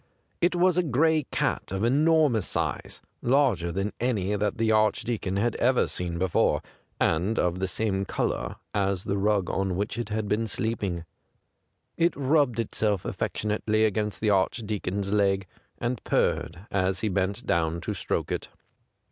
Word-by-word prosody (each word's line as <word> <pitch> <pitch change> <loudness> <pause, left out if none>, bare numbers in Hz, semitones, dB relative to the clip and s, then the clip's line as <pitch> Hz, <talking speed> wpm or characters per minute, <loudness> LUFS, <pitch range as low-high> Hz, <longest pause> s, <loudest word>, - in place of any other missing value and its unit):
It 175 +1 +3
was 180 0 +3
a - - +5
gray 155 0 +2
cat - - -1
of 95 +2 -2
enormous 145 - +3
size, - - -3 0.2
lai 135 0 +4
ger 85 -2 -4
than 95 +4 -2
any 105 -5 0
that 105 0 -1
the 115 -1 +2
Archdeacon 110 -2 +1
had 115 +3 +1
ever 125 +1 +3
seen 85 -1 -3
before, 90 0 +2 0.4
and 90 +8 +1
of 90 0 +1
the 95 - 0
same 95 +1 -1
colour - - -2 0.2
as 100 -2 0
the 100 0 -1
rug 100 -2 +2
on 95 -2 -1
which 105 +4 -2
it 120 - -3
had 110 0 -2
been 110 +2 0
sleep 110 +3 -2
ing. 85 -4 -2 0.9
It 170 0 +2
rubbed 140 -3 +2
itself 105 -3 0
affectionately 110 +1 0
against 105 -1 -1
the 105 -1 +3
Archdeacon's 100 -1 -1
leg, 100 -2 +2 0.3
and 120 -1 -3
purred 85 +5 0
as 95 -1 0
he 110 - 0
bent 95 0 -1
down 85 0 +1
to - - -3
stroke - - -2
it. - - -2
105 Hz, 160 wpm, -27 LUFS, 95-120 Hz, 0.9 s, a